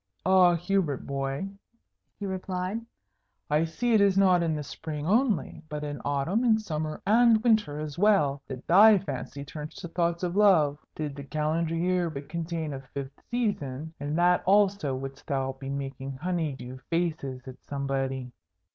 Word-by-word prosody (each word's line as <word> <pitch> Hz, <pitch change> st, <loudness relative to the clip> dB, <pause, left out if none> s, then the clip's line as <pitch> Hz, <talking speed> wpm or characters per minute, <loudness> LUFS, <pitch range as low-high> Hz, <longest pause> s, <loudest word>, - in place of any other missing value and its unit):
"Ah, 185 Hz, -2 st, +6 dB
Hubert 175 Hz, -5 st, -1 dB
boy," 135 Hz, +5 st, -2 dB, 0.7 s
he 205 Hz, -, -4 dB
replied, 185 Hz, +2 st, -3 dB, 0.7 s
"I 155 Hz, +2 st, +3 dB
see 235 Hz, +9 st, -1 dB
it 215 Hz, -, +5 dB
is 195 Hz, -1 st, +4 dB
not 185 Hz, -3 st, +5 dB
in 165 Hz, -2 st, 0 dB
the 150 Hz, -, -3 dB
Spring 150 Hz, 0 st, -6 dB
only, 215 Hz, -, +1 dB
but 150 Hz, 0 st, -4 dB
in 145 Hz, -1 st, -5 dB
Autumn 145 Hz, -, 0 dB
and 225 Hz, -3 st, +4 dB
Summer 155 Hz, -6 st, -4 dB
and 225 Hz, +1 st, +5 dB
Winter 215 Hz, -11 st, +2 dB
as 155 Hz, +1 st, -5 dB
well, 165 Hz, -10 st, +3 dB
that 130 Hz, -1 st, -7 dB
thy 205 Hz, +4 st, +7 dB
fancy 140 Hz, -5 st, -5 dB
turns 150 Hz, +1 st, -8 dB
to 200 Hz, -3 st, -7 dB
thoughts 170 Hz, +1 st, -1 dB
of 175 Hz, 0 st, -1 dB
love. 160 Hz, -9 st, +4 dB, 0.2 s
Did 150 Hz, -3 st, -4 dB
the 140 Hz, -, -7 dB
calendar 155 Hz, +3 st, -1 dB
year 175 Hz, 0 st, +1 dB
but 140 Hz, -2 st, -8 dB
contain 165 Hz, -2 st, -3 dB
a 135 Hz, -, -5 dB, 0.2 s
fifth 140 Hz, 0 st, -6 dB
season, 160 Hz, -, -2 dB
in 145 Hz, +2 st, -3 dB
that 175 Hz, +1 st, +4 dB
also 195 Hz, -8 st, +3 dB
wouldst 135 Hz, +1 st, -7 dB
thou 135 Hz, -2 st, -1 dB
be 135 Hz, 0 st, -8 dB
making 135 Hz, -1 st, -4 dB
honey 160 Hz, +1 st, -2 dB
dew 125 Hz, 0 st, -9 dB
faces 155 Hz, -7 st, -2 dB
at 130 Hz, -1 st, -8 dB
somebody." 135 Hz, -2 st, -2 dB
160 Hz, 165 wpm, -28 LUFS, 140-190 Hz, 0.7 s, thy